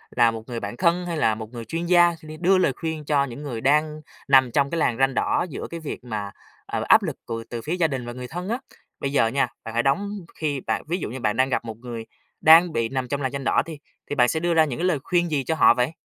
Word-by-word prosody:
là 120 -2 +5
một 110 -1 -7
người 120 -2 -4
bạn 105 +3 -6
thân 175 0 +2
hay 170 -2 -3
là 110 -7 +2
một 110 0 -8
người 115 -1 -7
chuyên 165 +9 -3
gia, 175 -1 +5
sẽ 155 -1 -15
đi 155 0 -8
đưa 185 +3 +3
lời 145 -7 +2
khuyên 160 0 -5
cho 145 -2 +2
những 140 +2 -7
người 120 -6 -5
đang 150 +2 +2 0.3
nằm 130 -2 +5
trong 140 +2 +2
cái 170 - -3
làn 120 -6 +1
ranh 135 0 +2
đỏ 175 - +1
giữa - - -6
cái 170 - -6
việc 155 -5 -6
mà, 105 -4 -4 0.3
ờ, - - -3
áp - - +6
lực - - -3
của 115 0 -4
từ 120 -1 -5
phía 155 +7 -3
gia 170 -3 +2
đình 130 -4 -4
và 120 - -6
người 125 0 -7
thân 180 - -6
á. 235 - 0 0.4
Bây 140 - -2
giờ 125 -5 +3
nha, 130 +2 +1 0.2
bạn 115 -1 -7
hãy 120 - +1
đóng 200 +10 +1 0.3
khi 145 -3 -2
bạn - - -2
ví 175 +3 -1
dụ 155 - -4
như 130 +3 -6
bạn 105 -1 0
đang 130 +1 +3
gặp 125 - -1
một 110 -2 -7
người 115 -1 -7 0.4
đang 165 +1 +7
bị 115 -1 0
nằm 130 -2 -2
trong 140 +1 -3
làn 130 -1 -1
ranh 140 -1 -4
đỏ - - +3
đi, 160 -3 -8 0.3
thì 145 - -2
bạn 125 -3 +4
sẽ 160 - 0
đưa 170 +1 0
ra 160 -1 +5
những 140 -1 -5
cái 180 - 0
lời 155 -6 +1
khuyên 175 -1 +1
gì 140 -3 0
cho 160 - -1
họ 120 - +6
vậy? 125 +4 0
140 Hz, 295 wpm, -24 LUFS, 120-165 Hz, 0.4 s, đang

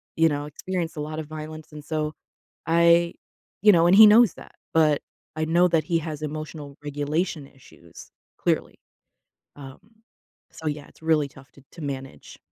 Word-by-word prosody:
you 165 0 +4
know, 145 -1 -3
experienced 170 +3 -4
a - - -3
lotta 155 +1 -5
violence. 155 +1 -9
And 150 -1 -10
so 155 0 -3 0.5
I 170 +1 +4 0.5
you 210 0 +7
know, 170 -2 +4
and 185 - +5
he 220 +1 +11
knows 215 -1 +6
that, - - -14 0.2
but 155 -3 +3 0.3
I 155 0 -1
know 170 +3 +3
that 165 -2 +2
he 170 -2 0
has 155 -2 -6
emotional 155 -1 -6
regulation 145 +2 -2
issues 85 - -16 0.2
clearly. - - -1 0.8
Um, 135 -2 -11 0.7
so, 160 - -8
yeah, 150 -1 -4
it's - - -22
really 160 -2 +2
tough 135 0 -17
to 140 - -19
to 170 - -12
manage. 135 -2 -7
155 Hz, 165 wpm, -24 LUFS, 145-165 Hz, 0.8 s, he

